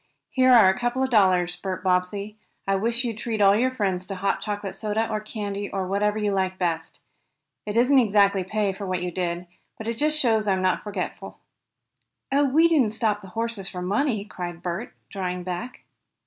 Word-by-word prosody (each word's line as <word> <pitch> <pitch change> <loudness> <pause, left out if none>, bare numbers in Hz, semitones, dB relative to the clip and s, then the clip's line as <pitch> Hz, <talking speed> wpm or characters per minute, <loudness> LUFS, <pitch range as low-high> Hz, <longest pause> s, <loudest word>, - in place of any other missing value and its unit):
Here 255 -1 +4
are 230 -6 +8
a 190 0 +2
couple 245 +2 0
of 260 - -1
dollars, 180 -5 +3
Bert 185 0 -5
Bobbsey. 190 +3 0 0.3
I 195 - +2
wish 230 +5 0
you'd 230 -3 -3
treat 225 -1 -3
all 200 -1 +6
your 250 +4 +2
friends 190 -7 -2
to 195 - -4
hot 195 +1 -1
chocolate 205 -1 -4
soda 220 +1 -1
or 215 -1 -2
candy 205 -1 -5
or 195 -1 -2
whatever 205 +3 0
you 210 -1 0
like 190 -1 -1
best. 165 -3 -3 0.7
It 210 +2 -2
isn't 260 +3 +5
exactly 200 -4 +3
pay 205 +1 -1
for 195 0 -6
what 185 -1 -1
you 180 - -2
did, 175 0 -2 0.3
but 220 - -7
it 230 0 -3
just 305 +1 +1
shows 220 -5 +2
I'm 190 -1 +1
not 185 -1 +1
forgetful." 200 -3 -5 0.9
"Oh, 285 +1 +3
we 310 +5 +4
didn't 275 -10 +2
stop 215 -2 0
the 195 - -11
horses 225 -4 -2
for 180 -1 -6
money!" 210 +2 0
cried 175 -4 -7
Bert, 175 0 -4 0.2
drawing 180 -2 -3
back. 185 +8 -5
205 Hz, 195 wpm, -25 LUFS, 185-225 Hz, 0.9 s, are